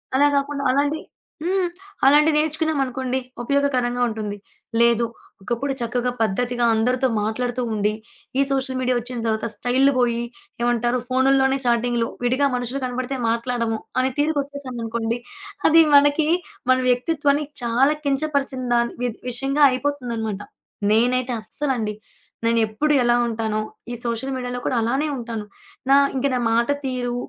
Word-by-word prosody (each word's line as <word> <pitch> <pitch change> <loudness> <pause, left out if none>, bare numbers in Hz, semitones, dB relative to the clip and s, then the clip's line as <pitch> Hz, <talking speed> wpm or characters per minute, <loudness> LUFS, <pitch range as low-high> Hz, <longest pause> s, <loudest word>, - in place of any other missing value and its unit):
అలా 290 +2 +5
కాకుండా 280 0 -2
అలాంటి 285 +3 +1 0.5
హ్మ్ 370 0 +1 0.4
అలాంటివి 300 +2 +5
నేర్చుకున్నాం 315 0 0
అనుకోండి, 260 0 -2 0.3
ఉపయోగకరంగా 255 -3 +1
ఉంటుంది. 210 -2 -4 0.4
లేదు 235 0 +4 0.4
ఒకప్పుడు 240 +7 -2
చక్కగా 245 +1 -1
పద్ధతిగా 240 +3 0
అందరితో 250 +4 +2
మాట్లాడుతూ 245 +3 -2
ఉండి, 210 0 +1 0.5
ఈ - - +6
సోషల్ 265 -1 -1
మీడియా 255 -1 +1
ఒచ్చిన 245 0 -6
తరువాత 220 +1 0
స్టైళ్ళు 260 +3 +2
బోయి, 235 -1 +1 0.4
ఏమంటారు 240 +1 +1
ఫోను‌ల్లోనే 265 +1 +3
చాటింగులు. 235 0 +1 0.2
విడిగా 255 +4 +2
మనుషులు 250 +2 -3
కనపడితే 255 +2 -3
మాట్లాడము, 230 -1 -1 0.2
అనే 260 +1 +2
తీరుకొచ్చేసామనుకోండి, 255 -6 -2 0.5
అది 325 +1 +7
మనకి 290 +2 +5 0.4
మన 255 - +5
వ్యక్తిత్వాన్ని 285 +3 +1 0.2
చాలా 255 +6 +3
కించపరిచిన 275 -2 -1
దా 235 - +4 0.2
వి 245 - +1 0.2
విషయంగా 270 +4 +1
అయిపోతుందన్నమాట. 245 -7 -2 0.5
నేనైతే 250 +2 +2
అస్సలండి 225 -3 -2 0.5
నేనెప్పుడు 230 +6 +2
ఎలా 240 0 +4
ఉంటానొ, 220 -2 -1 0.3
ఈ - - -3
సోషల్ 235 +3 -2
మీడియాలో 250 -1 -3
కూడా - - 0
అలానే 265 +7 0
ఉంటాను. 230 -3 -5 0.4
నా 275 - +7 0.2
ఇంక 265 +1 +1
నా 250 - +1
మాట 235 +1 +2 0.2
తీరు, 250 -2 -2
250 Hz, 130 wpm, -22 LUFS, 235-275 Hz, 0.5 s, అది